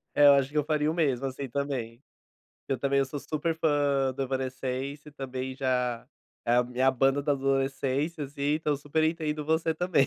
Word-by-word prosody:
É, 145 - +6
eu 140 - +9
acho 135 -1 +3
que 150 - -4
eu 150 - +3
faria 150 0 +1
o - - 0
mesmo, 135 -6 +1
assim 135 +1 -5
também. 130 -3 -3 0.7
Eu 135 - 0
também, 140 +2 +1
eu 135 - +3
sou 145 +2 -5
super 155 +3 -2
fã 145 -4 +2
do 135 - -2
Evanescence, 135 +2 -3
também 130 -1 -5
já 125 -3 -1 0.4
é 120 - +3
a 125 - +5
minha 125 +2 +2
banda 135 +2 +2
da 145 0 +2
adolescência 135 +2 0
assim, 140 +1 -2
então 150 -2 0
super 145 +3 -1
entendo 155 -2 -1
você 160 +1 +1
também. 175 -5 +2
140 Hz, 190 wpm, -28 LUFS, 130-150 Hz, 0.7 s, eu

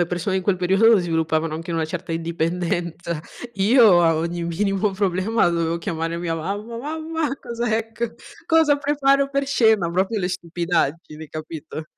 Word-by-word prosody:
le 175 - 0
persone 175 +2 -2
in 190 - -1
quel 190 0 +1
periodo 195 +5 +4
sviluppavano 160 -2 0
anche 165 +2 -6
una 165 -1 0
certa 170 +2 -6
indipendenza. 170 0 -2 0.3
Io 205 -2 +5
a 165 -1 +3
ogni 170 +2 -2
minimo 195 +4 0
problema 190 +2 +1
dovevo 170 0 0
chiamare 165 0 -3
mia 170 -1 -2
mamma. 205 +8 -4
"Mamma." 315 +3 -3
"Cos'è 230 -2 -2
q 235 0 -4 0.3
cosa 320 -3 +4
preparo 280 -1 +2
per 275 0 0
cena?" 220 -9 +3
Proprio, 190 +6 0
le 180 -2 -1
stupidaggini, 170 -3 -2
capito. 155 0 -7
180 Hz, 150 wpm, -22 LUFS, 165-225 Hz, 0.3 s, Io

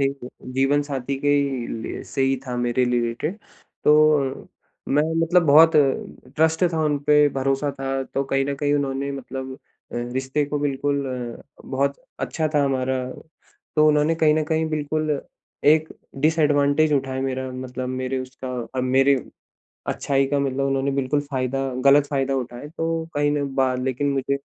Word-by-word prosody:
जीवन 135 +1 -1
साथी 140 -1 -3
के 145 - 0
ही 140 -4 +1 0.2
लिए - - -5
से 135 - -2
ही 135 0 +2
था 125 -1 -3
मेरे 120 +1 +1
रिलेटेड 120 - -1 0.5
तो 150 -3 +3 0.4
मैं 145 +2 +3 0.2
मतलब 175 +2 +4
बहुत 160 +3 +8 0.7
ट्रस्ट 160 +3 +3
था, 160 - -1
उनपे 150 0 +3
भरोसा 135 +2 0
था 135 0 -1
तो 135 - -2
कहीं 135 0 0
न 140 0 -2
कहीं 145 0 +1
उन्होंने 140 -1 -1
मतलब 130 0 -6 0.4
अ, - - -7
रिश्ते 130 +4 -1
को 145 +1 -3
बिल्कुल 140 0 -1 0.3
अ, - - -16 0.2
बहुत 140 +1 0 0.2
अच्छा 155 -1 -1
था 145 - +4
हमारा। 130 -1 0 0.7
तो 155 0 +6
उन्होंने 150 +2 +3
कहीं 155 -2 +3
न 155 - +1
कहीं 160 0 0
बिल्कुल 155 -1 -1 0.4
एक 155 +1 +5 0.3
डिसएडवांटेज 150 -1 +3
उठाया 130 -1 0
मेरा 130 -1 -3
मतलब 130 0 -5
मेरे 130 +1 -2
उसका 130 0 -8 0.3
अ, 130 - 0
मेरे 135 +2 +4 0.7
अच्छाई 135 -1 +1
का 140 0 0
मतलब 135 0 -1
उन्होंने 135 0 0
बिल्कुल 140 +2 0
फायदा 135 +1 -1 0.2
गलत 140 +1 +6
फायदा 135 -1 0
उठाया 125 +2 -5
तो 165 0 -1
कहीं 145 0 +2
ना 145 -1 0 0.2
बा 130 -1 +3
लेकिन 130 +2 -1
मुझे 140 0 0
140 Hz, 155 wpm, -23 LUFS, 130-150 Hz, 0.7 s, बहुत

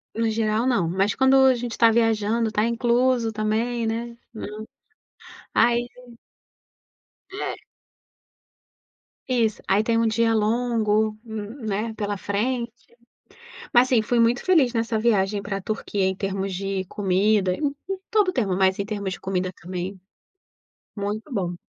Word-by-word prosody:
No 230 0 +1
geral, 220 +1 0
não. 235 -10 +2
Mas 195 +4 +1
quando 265 0 +4
a 260 - +5
gente 240 -1 -4
tá 230 -1 +6
viajando, 225 0 +1
tá 215 0 +1
incluso 235 0 +1
também, 225 +2 -1
né. 235 +1 -3 0.2
Hum. 215 0 -7 0.9
Aí. 240 +1 +3 1.4
É. 400 - -4 1.7
Isso. 235 -4 0
Aí 200 +3 +3
tem 230 0 +1
um 230 - +2
dia 225 +1 +2
longo, 220 -1 +1
n 220 +2 -7
né, 215 +2 -2
pela 205 -1 -3
frente. 235 +5 -2 1.0
Mas, 245 +1 +5
assim, 235 -4 +3
fui 240 +2 0
muito 235 +1 +2
feliz 315 -10 +4
nessa 230 -1 -1
viagem 205 -3 +1
pra 195 -1 -3
Turquia, 205 -1 -2
em 190 - 0
termos 195 0 -3
de 195 0 -2
comida 195 0 +1
em - - -7
em - - -6 0.2
em - - -10
todo 420 -3 +3
o 370 - +1
termo, 205 -8 0
mas 190 0 +2
em 200 - -1
termos 200 -2 -4
de - - -12
comida 185 -1 -2
também. 185 +2 -5 1.0
Muito 210 +6 -4
bom. 180 -5 -2
220 Hz, 145 wpm, -24 LUFS, 200-235 Hz, 1.7 s, tá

